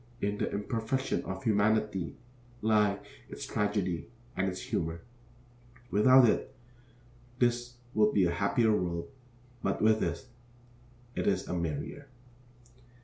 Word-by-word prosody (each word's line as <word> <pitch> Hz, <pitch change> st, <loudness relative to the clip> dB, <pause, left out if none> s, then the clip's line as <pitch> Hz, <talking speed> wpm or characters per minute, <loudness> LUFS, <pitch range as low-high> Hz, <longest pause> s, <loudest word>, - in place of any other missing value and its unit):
In 105 Hz, -1 st, -1 dB
the -, -, -1 dB
imperfection 115 Hz, +5 st, -1 dB
of 95 Hz, 0 st, -5 dB
humanity 105 Hz, -3 st, +1 dB, 0.5 s
lie 105 Hz, -2 st, +3 dB, 0.3 s
its -, -, -6 dB
tragedy 100 Hz, -5 st, -1 dB, 0.3 s
and 95 Hz, +1 st, 0 dB
its 90 Hz, -, -5 dB
humor. 80 Hz, 0 st, -3 dB, 0.9 s
Without 130 Hz, +5 st, +7 dB
it, 115 Hz, -, 0 dB, 0.8 s
this 120 Hz, 0 st, +1 dB, 0.2 s
would 105 Hz, 0 st, +4 dB
be 95 Hz, -3 st, +3 dB
a 85 Hz, -, +1 dB
happier 110 Hz, +6 st, +2 dB
world; 85 Hz, 0 st, -2 dB, 0.5 s
but -, -, -1 dB
with 110 Hz, 0 st, +4 dB
it, 85 Hz, +7 st, -2 dB, 0.9 s
it -, -, -2 dB
is -, -, +1 dB
a -, -, -3 dB
merrier. 85 Hz, -, -3 dB
105 Hz, 120 wpm, -30 LUFS, 90-110 Hz, 0.9 s, Without